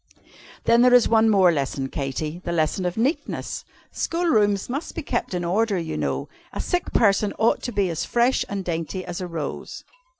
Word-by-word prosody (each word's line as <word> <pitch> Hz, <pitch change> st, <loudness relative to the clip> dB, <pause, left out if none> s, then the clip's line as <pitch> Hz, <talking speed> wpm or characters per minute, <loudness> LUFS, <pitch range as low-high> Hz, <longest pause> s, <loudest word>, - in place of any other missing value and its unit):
"Then, 235 Hz, +1 st, +4 dB
there 250 Hz, 0 st, +6 dB
is 245 Hz, -, +5 dB
one 225 Hz, -1 st, +4 dB
more 190 Hz, -4 st, +5 dB
lesson, 135 Hz, -3 st, -2 dB
Katy 150 Hz, +5 st, -4 dB
the 170 Hz, -, -3 dB
lesson 170 Hz, +2 st, 0 dB
of 180 Hz, -, -4 dB
Neatness. 265 Hz, +9 st, -2 dB, 0.3 s
School 340 Hz, +1 st, -2 dB
rooms 205 Hz, -, +2 dB
must 280 Hz, +6 st, -4 dB
be 330 Hz, -, -4 dB
kept 240 Hz, -8 st, -2 dB
in 175 Hz, -1 st, -2 dB
order, 205 Hz, +3 st, +1 dB
you 165 Hz, -2 st, -3 dB
know. -, -, -2 dB, 0.2 s
A -, -, -6 dB
sick 355 Hz, -1 st, -1 dB
person 205 Hz, -2 st, +3 dB
ought 225 Hz, +1 st, +2 dB
to 245 Hz, -, -4 dB
be 200 Hz, -3 st, +1 dB
as 165 Hz, 0 st, -2 dB
fresh 240 Hz, +2 st, +2 dB
and 195 Hz, -2 st, -4 dB
dainty 170 Hz, +2 st, -3 dB
as 175 Hz, 0 st, -5 dB
a 180 Hz, -, -3 dB
rose." 160 Hz, -4 st, -6 dB
195 Hz, 195 wpm, -23 LUFS, 170-235 Hz, 0.3 s, there